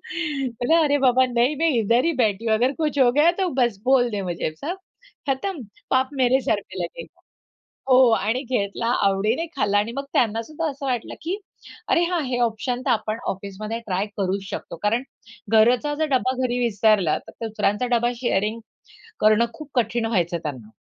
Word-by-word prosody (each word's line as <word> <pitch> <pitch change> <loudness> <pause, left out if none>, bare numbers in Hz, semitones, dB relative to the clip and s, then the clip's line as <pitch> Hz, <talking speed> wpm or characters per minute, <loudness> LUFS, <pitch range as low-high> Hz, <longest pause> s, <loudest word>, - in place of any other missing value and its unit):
म्हटलं, 295 - -1
"अरे 290 -1 +2
बाबा 255 +1 +4
नहीं, 245 +5 +2
मैं 325 +3 +2
इधर 230 +3 +2
ही 335 - +2
बैठी 215 0 0
हूँ. 220 - +3
अगर 245 +5 +2
कुछ 300 -2 -1
हो 255 -3 +6
गया 300 +5 +5
तो 370 - +1
बस 235 -5 0
बोल 250 -2 +4
दे 205 -2 -3
मुझे. 175 -3 -2
सब 355 +5 -3 0.5
खतम. 275 +4 -2 0.3
पाप 260 0 +2
मेरे 255 +2 +4
सर - - 0
पे - - -11
लगेगा." - - -10 0.7
हो, 255 - +6 0.2
आणि 225 +6 -1
घेतला, 230 -3 -2 0.2
आवडीने 210 +10 +1
खाल्ला 205 -6 +1
आणि 210 +3 0
मग 275 - -3
त्यांना 225 -2 +2
सुद्धा 310 +7 -4
असं 275 0 -7
वाटलं 250 -4 -2
की 345 +5 -2 0.5
"अरे 345 - +3
हां, 345 -1 0
हे 250 -1 -2
ऑप्शन 240 +2 -1
तर - - 0
आपण 220 -1 -1
ऑफिसमध्ये 200 +4 -4
ट्राय 190 +1 0
करूच 195 0 -1
शकतो," - - -6
कारण 230 +4 +1 0.5
घरचा 245 +6 +4
जर 315 +1 0
डबा 255 0 0
घरी 245 0 -1
विसरला, 215 -7 +2
तर 230 - -8
दुसऱ्यांचा 210 +2 0
डबा 240 +1 +1
शेअरिंग 230 -2 -1 0.6
करणं 215 +2 +4
खूप 300 +5 -10
कठीण 235 -1 +1
व्हायचं 180 -6 0
त्यांना. 130 -8 -6
240 Hz, 180 wpm, -23 LUFS, 215-270 Hz, 0.7 s, हो